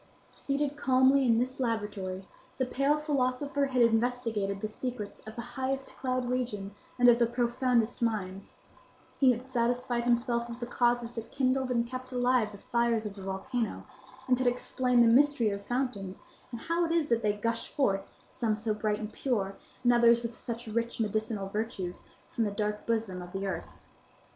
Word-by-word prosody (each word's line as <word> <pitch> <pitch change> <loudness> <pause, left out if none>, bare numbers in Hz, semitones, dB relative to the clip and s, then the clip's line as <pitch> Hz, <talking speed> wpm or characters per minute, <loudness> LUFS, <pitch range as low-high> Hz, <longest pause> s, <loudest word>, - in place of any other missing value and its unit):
Seated 285 0 -1
calmly 265 -1 +4
in 230 -1 +4
this 255 +3 -1
laboratory, 205 -6 -2 0.3
the 260 - +1
pale 275 +4 +2
philosopher 285 -1 0
had 255 -2 +3
investigated 225 -4 +1
the 215 - -2
secrets 215 -1 -5
of 220 - -8
the 235 - -4
highest 270 +1 -3
cloud 255 -1 -1
region 235 -6 -2 0.2
and 245 -1 +5
of 240 0 +7
the 235 - +4
profoundest 240 0 +1
mines; 200 -4 -2 0.6
he 270 - +6
had 245 +1 -3
satisfied 245 -1 0
himself 235 0 +1
of 235 +1 -7
the 240 - -3
causes 240 -1 +1
that 230 -1 -7
kindled 260 -1 +1
and 235 -1 +1
kept 255 +1 -7
alive 245 -3 +2
the 200 - -10
fires 235 0 0
of 210 - -4
the 200 - -11
volcano; 195 - -3 0.4
and 250 -1 +3
had 255 - +1
explained 250 0 +2
the - - +5
mystery 250 -2 +4
of 200 0 -5
fountains, 225 -6 -3 0.3
and 235 -2 -6
how 335 +1 0
it 330 - 0
is 335 -2 +2
that 235 -5 +1
they 210 -1 +2
gush 230 +2 -2
forth, 200 -9 +1 0.3
some 220 -2 -1
so 215 0 -1
bright 210 0 0
and 215 -1 -6
pure, 200 -7 -1 0.3
and 245 0 +5
others 235 0 +5
with 235 0 -3
such 235 +1 -5
rich 230 +2 -2
medicinal 215 -2 -1
virtues, 195 -3 -4 0.3
from 230 - -1
the 210 - +1
dark 210 +1 -3
bosom 220 -5 -1
of 175 0 -9
the 195 +1 -3
earth. 195 - -5
235 Hz, 180 wpm, -30 LUFS, 215-255 Hz, 0.6 s, of